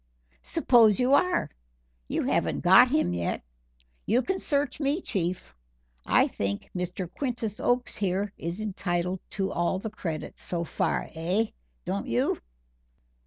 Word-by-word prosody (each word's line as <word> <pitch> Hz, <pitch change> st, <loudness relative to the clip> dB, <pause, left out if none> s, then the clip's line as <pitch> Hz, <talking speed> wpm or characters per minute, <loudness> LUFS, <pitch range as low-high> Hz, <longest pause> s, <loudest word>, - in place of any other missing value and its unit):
"Suppose 215 Hz, -, +4 dB
you 255 Hz, +2 st, +3 dB
are! 360 Hz, +5 st, +3 dB, 0.6 s
you -, -, -1 dB
haven't -, -, 0 dB
got -, -, +7 dB
him 90 Hz, -, +1 dB
yet. 85 Hz, -1 st, -2 dB, 0.6 s
You 245 Hz, +5 st, +3 dB
can 380 Hz, 0 st, -1 dB
search 290 Hz, 0 st, 0 dB
me, 290 Hz, +3 st, +1 dB
Chief. 180 Hz, -, -3 dB, 0.5 s
I -, -, +5 dB
think 100 Hz, 0 st, -4 dB
Mr. 180 Hz, 0 st, -3 dB
Quintus 230 Hz, -, -3 dB
Oakes 245 Hz, 0 st, 0 dB
here 200 Hz, +1 st, -1 dB
is 170 Hz, +5 st, -4 dB
entitled 180 Hz, -3 st, -2 dB, 0.2 s
to 195 Hz, -1 st, 0 dB
all 175 Hz, +2 st, 0 dB
the 215 Hz, +3 st, -5 dB
credit 165 Hz, -7 st, -5 dB
so 170 Hz, -1 st, -2 dB
far -, -, -1 dB
eh 180 Hz, +7 st, 0 dB, 0.3 s
don't -, -, -2 dB
you?" -, -, +1 dB
195 Hz, 135 wpm, -27 LUFS, 175-245 Hz, 0.6 s, got